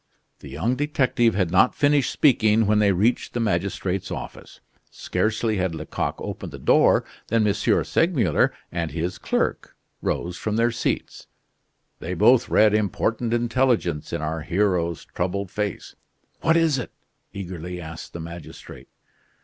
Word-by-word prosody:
The - - -11
young 120 +3 -1
detective 130 -6 +1
had 90 -4 0
not 95 +6 +4
finished 145 -2 +2
speaking 110 -6 +3
when 105 +1 +3
they 100 -1 +4
reached 105 +8 0
the - - 0
magistrate's 100 -3 -1
office. - - -8 0.3
Scarcely 110 0 -1
had 90 -3 -1
Lecoq - - -3
opened - - -6
the - - -8
door - - +4 0.2
than 115 -1 +2
M. 105 - +3
Segmuller 115 - +2 0.2
and 85 -2 -2
his 85 +4 -4
clerk - - -2 0.3
rose 85 +1 -2
from 110 -1 -2
their 115 +1 +2
seats. 115 - -3 0.7
They - - -4
both - - +4
read 110 -1 +4
important 110 +3 0
intelligence 120 - 0
in 75 - -3
our 80 +1 -3
hero's 85 -1 0
troubled 95 +2 -3
face. 105 -3 -4 0.5
"What 165 +1 +3
is 160 -5 +2
it?" 125 - -5 0.4
eagerly 90 -2 -6
asked 80 -1 -9
the 85 - -6
magistrate. 85 0 -10
105 Hz, 140 wpm, -23 LUFS, 90-115 Hz, 0.7 s, not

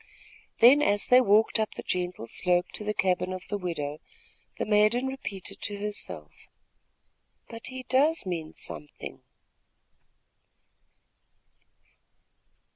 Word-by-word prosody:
Then, 260 +6 +8
as 205 -8 +2
they 250 +1 +6
walked 220 0 +4
up 220 - -1
the - - -6
gentle 180 -7 -3
slope 175 +9 +1
to - - -5
the 210 - -1
cabin 180 -1 +1
of 185 0 -6
the 205 - -1
widow, 155 -5 -4 0.6
the - - -1
maiden 215 +4 +3
repeated 200 -7 -6
to 205 - -4
herself: 90 - -5 1.2
"But 230 0 -7
he 260 0 -7
does 285 +3 +2
mean 165 -4 -4
something!" 150 - -6
205 Hz, 115 wpm, -28 LUFS, 180-230 Hz, 1.2 s, Then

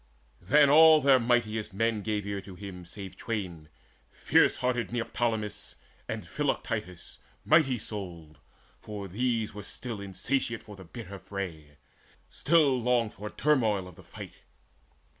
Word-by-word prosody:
Then 145 +11 +5
all 155 +2 +8
their 135 -3 +5
mightiest 115 -4 0
men 115 0 +1
gave 105 -1 -2
ear 100 -1 -3
to 95 -1 -11
him 90 -2 -9
Save 95 +1 -8
twain, 90 -9 -5 0.4
fierce - - +3
hearted 125 -2 -1
Neoptolemus 115 -2 -2 0.3
And - - -4
Philoctetes 90 -1 -3 0.3
mighty 150 -5 +4
souled; 90 -8 -7 0.4
for 105 -2 -7
these 115 +2 -1 0.2
Still 120 -3 -4
were 100 - -7
insatiate 115 +5 -2
for 105 - -11
the 95 -1 -12
bitter 100 0 -9
fray, 85 -6 -7 0.5
Still 145 -5 +3
longed 120 -2 +1
for 105 +1 -7
turmoil 110 -11 +1
of 90 - -13
the 95 - -14
fight. 85 - -10
105 Hz, 135 wpm, -29 LUFS, 95-125 Hz, 0.5 s, all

